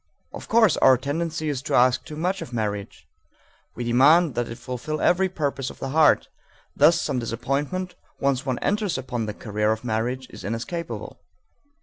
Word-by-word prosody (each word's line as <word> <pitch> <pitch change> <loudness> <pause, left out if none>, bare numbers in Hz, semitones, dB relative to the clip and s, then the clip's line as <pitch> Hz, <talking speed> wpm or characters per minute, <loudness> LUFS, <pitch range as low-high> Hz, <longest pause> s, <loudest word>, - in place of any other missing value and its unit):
Of - - -8
course 220 -7 +4
our 130 - +6
tendency 155 +4 -3
is 140 -4 -2
to - - -2
ask 125 0 +4
too 150 - -9
much 180 +5 -1
of - - -7
marriage. 105 -4 -4 0.7
We 120 - -4
demand 140 +7 +5
that 120 -1 -2
it 115 - -7
fulfill 150 +5 -5
every 190 +4 +3
purpose 140 -6 -2
of - - -11
the 135 - -5
heart; 150 +1 +4 0.5
thus 155 +4 +5
some 135 -4 -1
disappointment, 140 +10 -2 0.3
once 135 -1 +1
one 130 -3 -2
enters 205 -4 0
upon 125 -4 -3
the 105 - -5
career 105 0 -1
of 110 +1 -2
marriage, 125 +3 -2
is - - -10
inescapable. 125 - -5
135 Hz, 175 wpm, -24 LUFS, 120-160 Hz, 0.7 s, our